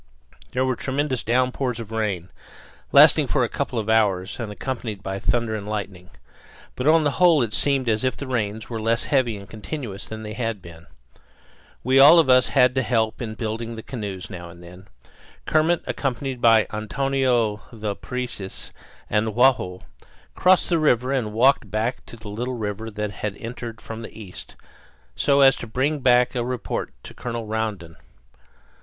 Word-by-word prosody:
There 130 +1 +1
were 130 -1 0
tremendous 135 0 -2
downpours 125 +1 0
of 110 -1 -8
rain, 100 -6 -2 0.6
lasting - - +7
for - - +1
a - - +1
couple - - -3
of 110 -2 -2
hours 105 -3 +1
and 115 -3 -4
accompanied 110 -2 -5
by 95 0 -4
thunder 115 +3 0
and 105 -2 -5
lightning. 95 -4 -5 0.7
But 125 - -2
on 160 0 +5
the 145 - +2
whole 165 -7 +6
it 110 -2 -4
seemed 135 +2 +1
as 110 +1 +1
if 130 - 0
the 140 - -6
rains 110 -4 -2
were 115 -2 -5
less 115 +2 +1
heavy 125 -6 +1
and 100 -1 -11
continuous 110 - -7
than 110 0 -7
they 105 0 -6
had 115 -2 -3
been. 85 -2 -13 1.0
We 130 +2 +4
all 145 +5 +9
of 160 -6 +5
us 130 0 +5
had 125 0 +4
to 130 - +1
help 110 -2 0
in 110 -2 -5
building 115 +1 -4
the 110 - -8
canoes 100 -8 -6
now 85 -1 -8
and 85 +1 -13
then. 90 +3 -13 0.6
Kermit, 160 +2 +2
accompanied 130 -1 -3
by 115 -2 +5
Antonio 120 -1 0
the 110 -3 -4
Parecis 125 -6 -6 0.4
and 105 0 0
Joao, 115 -8 +3 0.5
crossed 185 0 +3
the 170 -2 +2
river 130 -4 +2
and 120 -6 -1
walked 120 0 +3
back 110 +5 -2
to - - -10
the 110 -2 -10
little 120 +5 -4
river 110 0 -4
that 105 -1 -4
had 105 0 -5
entered 115 -1 -7
from 115 0 -8
the 115 - -10
east, 95 -4 -9 0.6
so 140 - +3
as 135 -1 +7
to 120 - -7
bring 135 +7 0
back 125 -2 +4
a 120 -2 -1
report 125 -1 -3
of - - -34
it - - -38
to - - -10
Colonel 115 -1 -5
Rondon. 105 -6 -4
115 Hz, 180 wpm, -23 LUFS, 105-130 Hz, 1.0 s, all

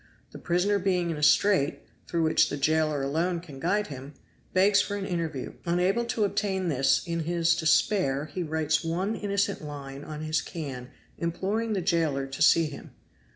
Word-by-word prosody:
The - - -10
prisoner 190 +4 +1
being 180 -3 0
in 160 - -4
a - - -6
strait, 165 -1 +3 0.2
through 170 -1 0
which 160 - +3
the 145 - -3
jailer 155 0 +1
alone 165 +5 0
can 150 -6 -11
guide 200 +7 +1
him, 140 -1 -9 0.4
begs 200 +2 +4
for 205 - -3
an 195 - -4
interview; 165 -7 -3
unable 180 +7 +1
to 230 -2 -1
obtain 195 -2 0
this 135 -2 +2
in 170 -1 -2
his 170 +1 +1
despair 160 - +2
he 155 +4 -5
writes 160 0 0
one 180 +6 -1
innocent 200 -1 -1
line 140 -2 -7
on 150 0 -7
his 155 0 0
can 135 -6 -7 0.3
imploring 200 +7 -1
the 195 - 0
jailer 165 -6 +1
to 135 +2 -8
see 165 +1 +6
him. 150 -2 -9
165 Hz, 175 wpm, -27 LUFS, 150-190 Hz, 0.4 s, see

